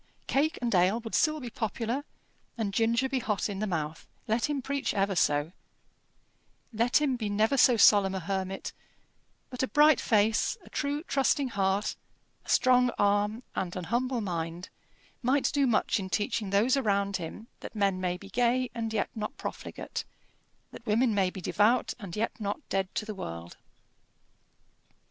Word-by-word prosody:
Cake 300 Hz, +4 st, +1 dB
and 235 Hz, -, 0 dB
ale 185 Hz, +5 st, +3 dB
would 225 Hz, -1 st, -8 dB
still 310 Hz, 0 st, +2 dB
be 245 Hz, -4 st, -7 dB
popular, 230 Hz, +5 st, -2 dB, 0.5 s
and 210 Hz, -4 st, -2 dB
ginger 230 Hz, +4 st, +2 dB
be 265 Hz, 0 st, -1 dB
hot 210 Hz, -4 st, -1 dB
in 195 Hz, -1 st, -4 dB
the 215 Hz, -, -1 dB
mouth, 160 Hz, -3 st, -3 dB, 0.2 s
let 225 Hz, +5 st, +1 dB
him 290 Hz, -2 st, -1 dB
preach 280 Hz, +1 st, -2 dB
ever 195 Hz, 0 st, +1 dB
so 145 Hz, -1 st, +2 dB, 1.2 s
let 235 Hz, +5 st, +3 dB
him 285 Hz, -4 st, +1 dB
be 220 Hz, -4 st, -3 dB
never 215 Hz, +5 st, +2 dB
so 250 Hz, -2 st, +5 dB
solemn 200 Hz, -2 st, +6 dB
a -, -, -1 dB
hermit; 190 Hz, +1 st, -3 dB, 0.8 s
but 250 Hz, -, -4 dB
a 260 Hz, -, +1 dB
bright 300 Hz, -1 st, +5 dB
face, 220 Hz, -, +2 dB
a -, -, -16 dB
true 290 Hz, +1 st, -2 dB
trusting 275 Hz, -2 st, +1 dB
heart, 195 Hz, -1 st, 0 dB, 0.5 s
a -, -, -15 dB
strong 250 Hz, -1 st, +4 dB
arm, 205 Hz, +3 st, +1 dB
and 180 Hz, -2 st, -3 dB
an 180 Hz, -, -4 dB
humble 250 Hz, 0 st, 0 dB
mind, 170 Hz, -2 st, -4 dB, 0.5 s
might 260 Hz, +3 st, +2 dB
do 280 Hz, -2 st, +3 dB
much 220 Hz, -2 st, +2 dB
in 190 Hz, -1 st, -5 dB
teaching 205 Hz, 0 st, -1 dB
those 210 Hz, +7 st, +3 dB
around 200 Hz, -6 st, +1 dB
him 180 Hz, +5 st, -7 dB
that -, -, -9 dB
men 195 Hz, -3 st, +1 dB
may 180 Hz, -1 st, -1 dB
be 195 Hz, +1 st, -12 dB
gay 245 Hz, +3 st, +1 dB
and 225 Hz, -1 st, -3 dB
yet 210 Hz, -, -1 dB
not 215 Hz, -2 st, -5 dB
profligate, -, -, -6 dB, 0.7 s
that -, -, -11 dB
women 230 Hz, +1 st, +2 dB
may 195 Hz, -2 st, +2 dB
be 185 Hz, -, -8 dB
devout 215 Hz, +7 st, +2 dB
and 195 Hz, -6 st, -7 dB
yet 225 Hz, +2 st, 0 dB
not 205 Hz, -1 st, -2 dB
dead 195 Hz, -1 st, 0 dB
to 215 Hz, -, -2 dB
the 215 Hz, -, -5 dB
world. 85 Hz, -, -7 dB
215 Hz, 170 wpm, -29 LUFS, 195-250 Hz, 1.2 s, solemn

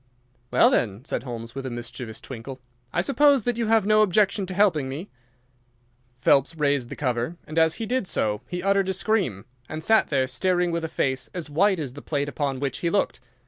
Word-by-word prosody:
"Well, -, -, +5 dB
then," 105 Hz, +2 st, 0 dB
said -, -, -2 dB
Holmes, 115 Hz, -2 st, -7 dB
with 135 Hz, -, -5 dB
a 130 Hz, -, -4 dB
mischievous 120 Hz, -1 st, -7 dB
twinkle, 130 Hz, +1 st, -8 dB, 0.3 s
"I -, -, +1 dB
suppose 280 Hz, +5 st, +4 dB
that 245 Hz, 0 st, -1 dB
you 230 Hz, -, 0 dB
have 220 Hz, -2 st, +3 dB
no 215 Hz, +1 st, +5 dB
objection 200 Hz, 0 st, +2 dB
to 185 Hz, -, -5 dB
helping 175 Hz, -9 st, +3 dB
me?" 150 Hz, +9 st, -6 dB, 1.0 s
Phelps 135 Hz, +5 st, +3 dB
raised 140 Hz, -5 st, +1 dB
the -, -, -6 dB
cover, 125 Hz, +4 st, -2 dB
and 155 Hz, +2 st, -1 dB
as 160 Hz, 0 st, +3 dB
he 225 Hz, -, -4 dB
did 250 Hz, -3 st, -1 dB
so 105 Hz, -, -1 dB
he 180 Hz, 0 st, -4 dB
uttered 195 Hz, -1 st, +2 dB
a -, -, +1 dB
scream, 185 Hz, -, 0 dB, 0.2 s
and 155 Hz, 0 st, -5 dB
sat 220 Hz, +5 st, +4 dB
there 135 Hz, -3 st, +1 dB
staring 175 Hz, +7 st, 0 dB
with 170 Hz, 0 st, -2 dB
a -, -, -1 dB
face 130 Hz, -5 st, -1 dB
as 165 Hz, -4 st, -5 dB
white 190 Hz, +6 st, +3 dB
as 140 Hz, -5 st, -4 dB
the 145 Hz, -, -9 dB
plate 145 Hz, -2 st, -2 dB
upon 140 Hz, -2 st, -2 dB
which 140 Hz, -2 st, -2 dB
he 170 Hz, -, 0 dB
looked. 200 Hz, +3 st, 0 dB
155 Hz, 210 wpm, -25 LUFS, 130-195 Hz, 1.0 s, Well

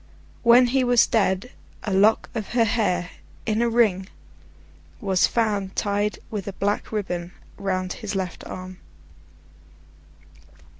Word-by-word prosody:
When 240 Hz, +1 st, +7 dB
he 265 Hz, -1 st, +3 dB
was 245 Hz, -1 st, +5 dB
dead, 205 Hz, 0 st, 0 dB, 0.3 s
a 205 Hz, -, -2 dB
lock 205 Hz, +4 st, +4 dB
of 220 Hz, -2 st, -5 dB
her 240 Hz, -1 st, +4 dB
hair, 180 Hz, -6 st, 0 dB, 0.3 s
in 220 Hz, 0 st, 0 dB
a 235 Hz, -, +2 dB
ring, 210 Hz, -5 st, +2 dB, 0.9 s
was 190 Hz, -5 st, +2 dB
found 205 Hz, -4 st, -1 dB
tied 205 Hz, +1 st, 0 dB
with 205 Hz, -3 st, -4 dB
a 200 Hz, -, -4 dB
black 205 Hz, +2 st, -2 dB
ribbon 180 Hz, -5 st, -3 dB, 0.2 s
round 185 Hz, -2 st, -2 dB
his 215 Hz, -4 st, -6 dB
left 185 Hz, -2 st, -4 dB
arm. 185 Hz, 0 st, -8 dB
205 Hz, 130 wpm, -24 LUFS, 190-225 Hz, 0.9 s, When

